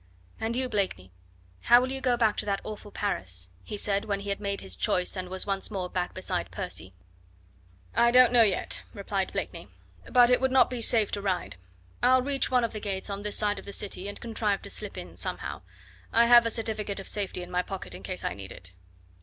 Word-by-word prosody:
"And 225 Hz, +1 st, -1 dB
you, 255 Hz, +1 st, 0 dB
Blakeney 185 Hz, -, -2 dB, 0.5 s
how 240 Hz, +1 st, +8 dB
will 255 Hz, +1 st, -1 dB
you 270 Hz, 0 st, -4 dB
go 250 Hz, -2 st, +2 dB
back 220 Hz, -3 st, +3 dB
to -, -, -2 dB
that 200 Hz, -1 st, 0 dB
awful 210 Hz, -1 st, -8 dB
Paris?" 95 Hz, -, -3 dB
he 210 Hz, -, -6 dB
said, 200 Hz, +1 st, 0 dB
when 200 Hz, -2 st, -2 dB
he 200 Hz, -, -6 dB
had 200 Hz, -, -1 dB
made 200 Hz, -1 st, -3 dB
his 95 Hz, -2 st, -7 dB
choice 180 Hz, -, 0 dB
and 185 Hz, -1 st, -5 dB
was 190 Hz, 0 st, -2 dB
once 195 Hz, -1 st, -2 dB
more 185 Hz, -4 st, -4 dB
back 180 Hz, -1 st, -2 dB
beside 185 Hz, -1 st, -3 dB
Percy. 180 Hz, -, -5 dB, 1.0 s
"I 235 Hz, -, +5 dB
don't 250 Hz, 0 st, +7 dB
know 240 Hz, -, +7 dB
yet," 205 Hz, -4 st, +1 dB
replied 195 Hz, -1 st, -2 dB
Blakeney, -, -, -5 dB, 0.4 s
"but 245 Hz, -1 st, +6 dB
it 250 Hz, -, +4 dB
would 265 Hz, -, +3 dB
not 260 Hz, -1 st, +4 dB
be 245 Hz, -2 st, -3 dB
safe 220 Hz, -2 st, +6 dB
to 205 Hz, -, -2 dB
ride. 185 Hz, -, -2 dB, 0.5 s
I'll 255 Hz, +1 st, +5 dB
reach 275 Hz, 0 st, +1 dB
one 250 Hz, -1 st, +3 dB
of 230 Hz, -, -1 dB
the 215 Hz, -, -4 dB
gates 200 Hz, -1 st, -4 dB
on 200 Hz, 0 st, -4 dB
this 210 Hz, 0 st, +1 dB
side 210 Hz, -1 st, +1 dB
of -, -, -12 dB
the 200 Hz, -, -7 dB
city 195 Hz, -1 st, -2 dB
and 205 Hz, -, -6 dB
contrive 220 Hz, -3 st, -1 dB
to -, -, -8 dB
slip -, -, -5 dB
in -, -, -8 dB
somehow. -, -, -4 dB, 0.5 s
I 235 Hz, +1 st, +6 dB
have 240 Hz, -1 st, +7 dB
a -, -, +1 dB
certificate 215 Hz, -3 st, -2 dB
of 195 Hz, -, -8 dB
safety 195 Hz, -3 st, -3 dB
in 175 Hz, -, -10 dB
my 180 Hz, 0 st, +1 dB
pocket 180 Hz, -, -6 dB
in 90 Hz, -, -9 dB
case 95 Hz, -1 st, -4 dB
I -, -, -1 dB
need 100 Hz, -1 st, -9 dB
it. 90 Hz, 0 st, -10 dB
205 Hz, 230 wpm, -28 LUFS, 185-235 Hz, 1.0 s, how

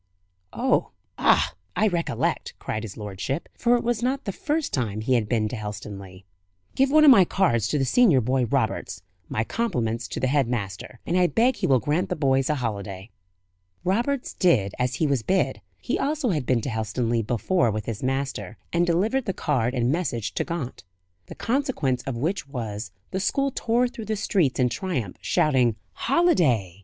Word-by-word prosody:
"Oh, -, -, +1 dB, 0.3 s
ah, -, -, +4 dB, 0.2 s
I 215 Hz, -, +3 dB
recollect," 175 Hz, -4 st, -1 dB
cried 110 Hz, -, -4 dB
his 110 Hz, -3 st, -8 dB
lordship 105 Hz, -, -4 dB
for 240 Hz, 0 st, +3 dB
it -, -, -4 dB
was 240 Hz, -1 st, 0 dB
not 265 Hz, +3 st, -1 dB
the 200 Hz, -, -1 dB
first 300 Hz, -, -2 dB
time 110 Hz, -5 st, -1 dB
he 130 Hz, +4 st, +1 dB
had 110 Hz, -4 st, +1 dB
been 110 Hz, -3 st, +1 dB
to 125 Hz, -, -4 dB
Helstonleigh. 100 Hz, -3 st, -7 dB, 0.5 s
"Give 270 Hz, 0 st, +3 dB
one 305 Hz, +2 st, +6 dB
of 285 Hz, -, +10 dB
my 200 Hz, -7 st, +8 dB
cards 120 Hz, -, +1 dB
to 150 Hz, -, 0 dB
the 135 Hz, -, +1 dB
senior 180 Hz, -, +5 dB
boy, 125 Hz, +1 st, +1 dB
Roberts. 110 Hz, -7 st, -1 dB, 0.3 s
My 110 Hz, -, 0 dB
compliments 115 Hz, -, -2 dB
to -, -, -5 dB
the -, -, 0 dB
head 135 Hz, -1 st, +2 dB
master, 110 Hz, 0 st, -4 dB
and 170 Hz, -, -1 dB
I 180 Hz, -1 st, +4 dB
beg 235 Hz, +6 st, +2 dB
he -, -, 0 dB
will 135 Hz, -, +5 dB
grant 150 Hz, +8 st, 0 dB
the -, -, -1 dB
boys 135 Hz, -2 st, +2 dB
a 150 Hz, -, +2 dB
holiday." 100 Hz, -5 st, -4 dB, 0.7 s
Roberts 240 Hz, +8 st, 0 dB
did 110 Hz, -, +2 dB
as 125 Hz, 0 st, 0 dB
he 160 Hz, -, +1 dB
was 140 Hz, -4 st, +1 dB
bid 190 Hz, -, 0 dB, 0.2 s
he -, -, -2 dB
also 290 Hz, -2 st, 0 dB
had 150 Hz, -9 st, -1 dB
been 125 Hz, -3 st, +2 dB
to 135 Hz, -, -3 dB
Helstonleigh 115 Hz, 0 st, -1 dB
before 120 Hz, -, +1 dB
with 110 Hz, -1 st, -3 dB
his 110 Hz, -3 st, -4 dB
master 130 Hz, -6 st, -2 dB, 0.2 s
and 170 Hz, +1 st, +2 dB
delivered 215 Hz, +10 st, +1 dB
the 195 Hz, -, -1 dB
card 125 Hz, -6 st, 0 dB
and 120 Hz, 0 st, +1 dB
message 120 Hz, -, -2 dB
to -, -, 0 dB
Gaunt. 165 Hz, -7 st, -5 dB, 0.4 s
The -, -, -9 dB
consequence 235 Hz, -, 0 dB
of 130 Hz, -3 st, -2 dB
which 165 Hz, +5 st, -2 dB
was, 110 Hz, -5 st, -5 dB, 0.2 s
the 190 Hz, -, -1 dB
school 275 Hz, +7 st, +1 dB
tore 240 Hz, +2 st, +1 dB
through 235 Hz, -3 st, -8 dB
the 215 Hz, +1 st, -1 dB
streets 180 Hz, -10 st, +1 dB
in 125 Hz, -1 st, +3 dB
triumph, 125 Hz, -, -3 dB
shouting 125 Hz, -7 st, +2 dB, 0.2 s
"Holiday!" 155 Hz, -, +2 dB
135 Hz, 190 wpm, -25 LUFS, -, 0.7 s, of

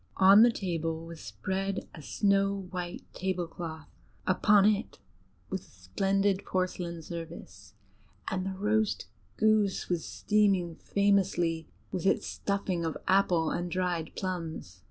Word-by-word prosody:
On 195 Hz, +3 st, +8 dB
the 240 Hz, +1 st, +7 dB
table 165 Hz, -5 st, -3 dB
was 165 Hz, -1 st, -9 dB
spread 190 Hz, -, -3 dB
a 160 Hz, -, -10 dB
snow 195 Hz, +3 st, +1 dB
white 180 Hz, -1 st, -5 dB
tablecloth; 175 Hz, -4 st, -4 dB, 0.4 s
upon 200 Hz, +2 st, +5 dB
it 210 Hz, 0 st, +1 dB, 0.5 s
was 190 Hz, -, -2 dB
a -, -, -20 dB
splendid 195 Hz, -, 0 dB
porcelain 180 Hz, -2 st, -2 dB
service, 165 Hz, 0 st, -9 dB, 0.5 s
and 185 Hz, -1 st, -1 dB
the 190 Hz, -1 st, -4 dB
roast 215 Hz, +1 st, +1 dB, 0.3 s
goose 215 Hz, -3 st, +2 dB
was 175 Hz, -3 st, 0 dB
steaming 195 Hz, -5 st, +1 dB
famously 190 Hz, -5 st, +1 dB, 0.2 s
with 185 Hz, -1 st, -1 dB
its -, -, +2 dB
stuffing 195 Hz, -3 st, -2 dB
of 160 Hz, -1 st, -2 dB
apple 180 Hz, -4 st, +3 dB
and 175 Hz, 0 st, -2 dB
dried 175 Hz, -3 st, -1 dB
plums. 165 Hz, -, -4 dB
185 Hz, 125 wpm, -30 LUFS, 165-195 Hz, 0.5 s, On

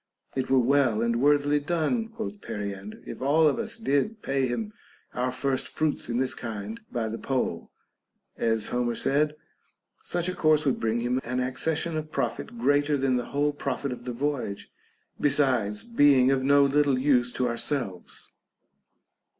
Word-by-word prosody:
It 130 Hz, -, -1 dB
were 135 Hz, -, +4 dB
well 125 Hz, -3 st, +3 dB
and 115 Hz, 0 st, 0 dB
worthily 145 Hz, +1 st, +3 dB
done, 170 Hz, -, 0 dB
quoth 220 Hz, -2 st, -6 dB
Periander, 100 Hz, 0 st, -6 dB
if -, -, -8 dB
all 155 Hz, +4 st, +4 dB
of 190 Hz, -, +1 dB
us 230 Hz, 0 st, -3 dB
did 210 Hz, +3 st, 0 dB
pay 135 Hz, -1 st, +1 dB
him 210 Hz, -, -3 dB, 0.4 s
our 125 Hz, +1 st, -1 dB
first 130 Hz, +1 st, -1 dB
fruits 155 Hz, -5 st, -1 dB
in 120 Hz, -, -1 dB
this 130 Hz, 0 st, +1 dB
kind 120 Hz, -, -6 dB
by 115 Hz, -3 st, -1 dB
the 110 Hz, +1 st, -5 dB
poll 125 Hz, -11 st, -2 dB, 0.7 s
(as 115 Hz, -2 st, 0 dB
Homer 120 Hz, -1 st, 0 dB
said). 150 Hz, +4 st, +1 dB, 0.7 s
Such 175 Hz, 0 st, -1 dB
a 185 Hz, -, -1 dB
course 155 Hz, -2 st, +3 dB
would 135 Hz, -, +1 dB
bring 115 Hz, +1 st, 0 dB
him 125 Hz, +2 st, 0 dB
an 125 Hz, +2 st, -2 dB
accession 155 Hz, +6 st, 0 dB
of 155 Hz, 0 st, -5 dB
profit 120 Hz, -3 st, -3 dB
greater 145 Hz, +4 st, +2 dB
than 130 Hz, -2 st, +1 dB
the 120 Hz, -, -2 dB
whole 145 Hz, +1 st, 0 dB
profit 140 Hz, -1 st, -3 dB
of 125 Hz, -1 st, -7 dB
the 125 Hz, -, -3 dB
voyage, 125 Hz, -5 st, -3 dB, 0.5 s
besides 130 Hz, -8 st, +2 dB
being 145 Hz, -, +4 dB
of 135 Hz, -1 st, +1 dB
no 140 Hz, +1 st, +5 dB
little 140 Hz, -1 st, +3 dB
use 130 Hz, -2 st, +2 dB
to 125 Hz, -, 0 dB
ourselves. 115 Hz, -5 st, -3 dB
135 Hz, 165 wpm, -27 LUFS, 120-150 Hz, 0.7 s, no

